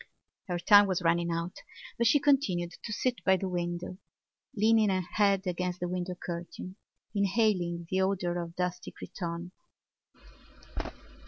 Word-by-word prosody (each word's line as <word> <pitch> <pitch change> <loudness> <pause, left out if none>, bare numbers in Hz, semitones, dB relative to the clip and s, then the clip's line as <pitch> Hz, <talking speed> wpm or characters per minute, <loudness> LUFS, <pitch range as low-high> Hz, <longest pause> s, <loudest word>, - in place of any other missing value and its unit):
Her 180 -2 -1
time 205 +3 +7
was 185 -2 -1
running 170 +1 +2
out 170 +1 -3 0.4
but 235 - +2
she 290 - +5
continued 210 -13 +2
to 225 - -5
sit 250 +3 -1
by 190 -1 +4
the 190 - -3
window, 175 0 -3 0.6
leaning 220 0 +4
her 190 -1 +1
head 200 -2 +3
against 180 0 -2
the 180 - -2
window 180 0 -3
curtain, 175 +1 -6 0.4
inhaling 195 -4 +1
the 190 +2 +1
odour 180 -2 0
of 170 0 -7
dusty 180 0 -3
cretonne. 170 -1 -6
180 Hz, 140 wpm, -30 LUFS, 175-200 Hz, 0.6 s, time